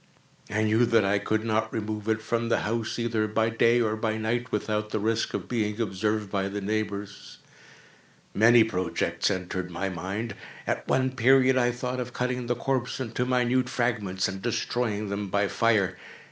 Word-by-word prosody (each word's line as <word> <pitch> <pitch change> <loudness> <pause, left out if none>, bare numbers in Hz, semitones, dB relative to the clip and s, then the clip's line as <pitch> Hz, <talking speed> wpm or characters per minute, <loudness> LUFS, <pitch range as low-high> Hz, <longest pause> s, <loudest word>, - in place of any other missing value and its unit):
I 105 +2 0
knew 110 +3 +3
that 115 -3 +4
I 100 +1 +2
could 110 +2 -1
not 110 -1 0
remove 110 -1 -3
it 110 0 0
from 115 +1 -1
the - - +2
house, 115 +1 -2
either 115 -2 0
by 110 +1 +1
day 115 +1 +4
or 110 -2 +1
by 110 0 -1
night, 115 +2 -2
without 105 0 -1
the - - -1
risk 110 +2 0
of - - -4
being 105 -3 -1
observed 105 -1 -1
by 95 -1 0
the 100 +1 -4
neighbors. 100 -1 -4 1.0
Many 115 +2 +6
projects 95 -5 -1
entered 95 -1 -3
my 90 +3 -3
mind. 95 +6 -4 0.3
At - - -2
one 130 0 +2
period 130 +1 +4
I 120 -1 +3
thought 125 +1 -4
of 125 0 -5
cutting 125 -1 -2
the 120 - +1
corpse 125 +1 -1
into 125 0 -2
minute 125 0 +2
fragments, 110 -7 0
and 95 0 -5
destroying 110 -2 -1
them 100 0 -3
by 100 +1 +1
fire. 100 -2 +2
110 Hz, 175 wpm, -27 LUFS, 105-120 Hz, 1.0 s, Many